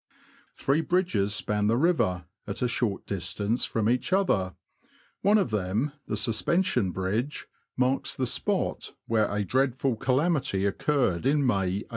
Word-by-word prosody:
Three 140 +4 +1
bridges 165 - +1
span 105 0 0
the 115 +2 +2
river, 125 - +1 0.2
at 100 +4 -3
a - - +3
short 115 -4 -1
distance 100 +4 -1
from 110 -2 -1
each 125 +7 0
other; 105 - +1 0.7
one 205 +2 +4
of 190 - 0
them 105 +7 -1
— - - -45
the 105 - -2
Suspension 110 - +1
Bride 100 +9 -1 0.3
— - - -43
marks 130 +1 +1
the 130 - -1
spot 120 - -1
where 110 -2 +1
a 105 0 -1
dreadful 130 +2 +1
calamity 135 - +1
occurred 120 - +1
in 145 0 +2
May, 100 -3 0
1845. - - -30
115 Hz, 155 wpm, -27 LUFS, 100-140 Hz, 0.7 s, one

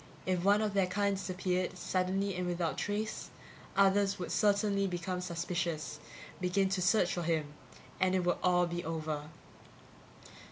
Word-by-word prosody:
If 185 -2 0
one 205 +2 +4
of 210 -2 -1
their 195 -2 +3
kind 200 +2 +1
disappeared, 185 -1 -2
suddenly 190 +2 0
and 180 0 -2
without 175 -2 -1
trace, 210 +1 -3 0.5
others 200 0 +4
would 180 - -5
certainly 200 -1 +2
become 180 0 -3
suspicious, 170 -3 -3 0.4
begin 190 +1 +2
to 190 -1 0
search 180 0 +3
for 175 - -2
him 160 -3 -1 0.5
and 185 0 +3
it 185 - +2
would 175 0 +1
all 180 -1 +4
be 175 0 -3
over. 155 -2 -3
185 Hz, 150 wpm, -32 LUFS, 175-195 Hz, 0.5 s, one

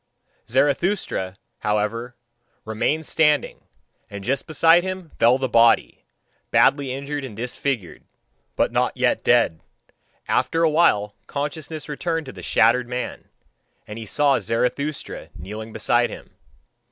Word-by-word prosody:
Zarathustra, 140 - 0 0.2
however, 105 +4 -2 0.5
remained 130 +8 -1
standing, 150 -2 +1 0.4
and 100 -1 -8
just 135 +6 -1
beside 165 +2 +5
him 185 -2 -6
fell 120 +2 +5
the 135 0 -1
body, 115 -1 +3 0.4
badly 140 -2 +3
injured 140 +2 -4
and 115 -6 -8
disfigured, 125 -4 -3 0.5
but - - +1
not - - 0
yet - - +1
dead. 80 - +3 0.7
After 165 0 +1
a 165 - +5
while 105 -11 +3
consciousness 150 +1 -5
returned 165 +2 -2
to 130 - -8
the - - -10
shattered 120 +2 +3
man, 125 0 -5 0.6
and 105 +2 -8
he 110 - -8
saw 145 +4 +3
Zarathustra 135 +6 -2
kneeling 105 +8 -8
beside - - +2
him. - - -11
135 Hz, 125 wpm, -22 LUFS, 110-150 Hz, 0.7 s, beside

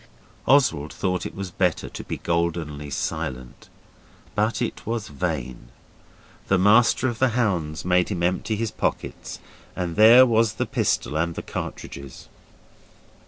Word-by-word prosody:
Oswald 85 - +3
thought 90 -2 -2
it - - -12
was 95 -2 -5
better 90 -2 0
to - - -8
be - - -5
goldenly 85 -4 -2
silent. 65 -2 -5 0.6
But 105 +1 0
it 120 - -3
was 115 -2 -3
vain. 65 -3 -4 0.8
The 95 - +3
Master 110 +6 +4
of 120 -3 -3
the 125 -3 +2
Hounds 85 -10 -1
made 90 0 +2
him 90 -4 -2
empty 90 +5 0
his 115 0 -2
pockets, - - -3 0.4
and 85 -2 -3
there 115 +4 +8
was 115 -2 +2
the - - -1
pistol - - -1
and 85 +1 -1
the - - -5
cartridges. 70 -1 -7
90 Hz, 140 wpm, -24 LUFS, 80-110 Hz, 0.8 s, there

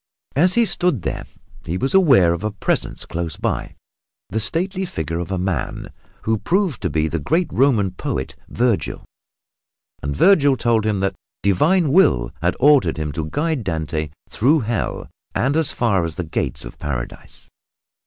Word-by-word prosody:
As 175 +6 +4
he 235 -1 +5
stood 175 - 0
there - - -3 0.4
he 85 +3 -3
was 135 +6 -1
aware 135 - +5
of 85 - -5
a 105 - 0
presence 100 - -2
close 85 -2 -4
by, - - -2 0.5
the 110 - -1
stately 185 - -1
figure 80 - -3
of 85 - -4
a 95 - -1
man, 90 -1 -3 0.3
who 110 -1 +1
proved 185 - 0
to 90 - 0
be 80 +1 +1
the 80 +1 -2
great 165 - +1
Roman 115 -8 +3
poet, 65 -7 -4
Vergil, 120 -3 0 1.0
and 70 0 -3
Vergil 145 -8 +5
told 115 -3 +1
him 105 -3 0
that 95 0 0 0.3
Divine 150 - +3
Will 60 - +4
had - - +1
ordered 145 - +4
him 75 -1 -2
to 75 +1 -4
guide 150 - -1
Dante 80 -4 -2 0.2
through 145 +7 +2
Hell 115 -1 -2 0.3
and 135 +4 +1
as 160 -2 +2
far 100 -7 +1
as 80 -1 -3
the 90 - -3
gates 80 -6 -3
of - - -10
Paradise. 65 -5 -6
105 Hz, 165 wpm, -21 LUFS, -, 1.0 s, he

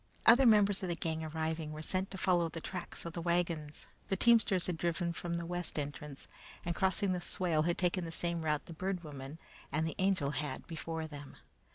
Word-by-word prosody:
Other 250 +2 +8
members 205 -3 +5
of 185 - -2
the 170 - +1
gang 160 -1 -2
arriving, 160 0 -2
were 155 +1 -6
sent 185 +4 0
to 190 - -5
follow 175 -3 +2
the 165 - -6
tracks 180 +1 -5
of 170 - -5
the 170 - -4
wagons. 170 -3 -1 0.2
The 195 - +2
teamsters 225 -5 +5
had 180 - -1
driven 170 0 0
from 170 0 -3
the 170 0 -3
west 175 -1 -1
entrance, 145 -1 -5 0.4
and 175 - 0
crossing 190 +1 +1
the 180 - -2
swale, 175 -3 +1
had 170 +2 +1
taken 180 0 +1
the 165 - -5
same 170 0 -1
route 150 -2 0
the 170 - -8
Bird 185 +2 -2
Woman 140 -1 -8 0.3
and 155 +3 +1
the 160 - -2
Angel 185 -7 +2
had 145 -2 -3
before 160 -1 -4
them. 145 -3 -9
170 Hz, 210 wpm, -34 LUFS, 155-185 Hz, 0.4 s, Other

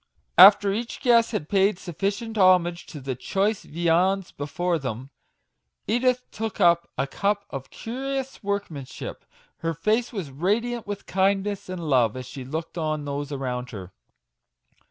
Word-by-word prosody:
After 200 +1 +9
each 230 +3 -4
guest 235 -2 +4
had 205 -10 -3
paid 195 0 +3
sufficient 200 +7 -3
homage 180 -3 +4
to 150 - -8
the 135 -1 -3
choice 195 - -1
viands 175 +4 +1
before 165 +4 -2
them, 130 0 -5 0.7
Edith 250 +1 +1
took 220 -1 -4
up 170 0 +4
a 135 - +1
cup 200 +7 -1
of 135 -2 -6
curious 270 +3 -4
workmanship; 200 -10 -5 0.3
her 165 0 -2
face 215 +9 +1
was 190 - -5
radiant 215 - -1
with 205 -1 -5
kindness 195 +1 0
and 175 -3 -5
love 125 -5 +3
as 130 - -6
she 130 +1 -8
looked 160 +6 -5
on 155 -2 -2
those 145 0 -4
around 125 -2 -3
her. 95 -5 -9
180 Hz, 145 wpm, -25 LUFS, 145-205 Hz, 0.7 s, After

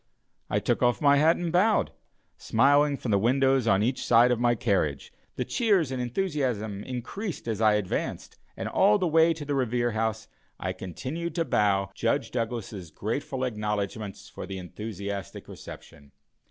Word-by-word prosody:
I - - +1
took - - 0
off 120 -1 +3
my 145 -1 +5
hat 160 +3 +5
and 175 -2 -2
bowed, 205 +5 +3 0.4
smiling 140 +4 +3
from 120 - -3
the 100 - +4
windows 130 +2 +2
on 100 -1 +3
each 125 +3 -1
side 120 +1 +5
of 120 - +1
my 120 0 +3
carriage; 90 - -1 0.2
the - - -2
cheers 200 - +1
and 130 -1 -2
enthusiasm 125 - -2
increased 130 - -5
as 110 -1 -2
I 110 -1 +5
advanced, 105 -3 -3 0.2
and - - -3
all 205 +2 +4
the 190 - -1
way 165 0 +4
to 160 -2 -4
the 145 - -2
Revere 120 -2 0
House 110 0 -2 0.3
I 90 0 -2
continued 130 - -5
to 165 - 0
bow 100 - +1
Judge 125 +6 -1
Douglas's 115 -6 -4
grateful 130 - -3
acknowledgments 105 -3 -3
for - - -8
the 95 - -5
enthusiastic 100 +1 -6
reception. 70 -1 -12
120 Hz, 165 wpm, -27 LUFS, 105-145 Hz, 0.4 s, my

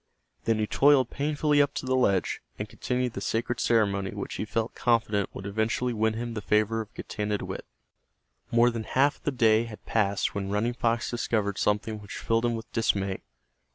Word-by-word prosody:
Then 115 -1 +2
he 110 - +1
toiled 135 +2 +4
painfully 150 0 +2
up 145 - +1
to - - -3
the 130 0 +1
ledge, 100 -7 +1 0.2
and 105 - -4
continued 125 +3 -2
the 100 - -5
sacred 115 +3 -1
ceremony 100 -4 +2
which 100 - -5
he - - -3
felt 110 +1 -2
confident 110 -4 +1
would 95 - -7
eventually 110 +4 0
win 110 0 +1
him 120 +1 -4
the 110 - -4
favor 110 +2 +2
of 110 - -9
Getanittowit. 105 -1 -3 0.9
More 120 +1 +4
than 115 -2 -4
half 140 +3 +2
of - - -31
the 145 - +1
day 115 -3 +3
had 110 -2 -10
passed 100 -3 +1
when 100 -1 -3
Running 105 +4 0
Fox 115 -1 0
discovered 110 -4 -1
something 105 +1 0
which 100 - -8
filled 115 +1 +1
him 120 -1 +1
with 115 +1 -8
dismay. 100 -4 0
115 Hz, 190 wpm, -27 LUFS, 105-120 Hz, 0.9 s, toiled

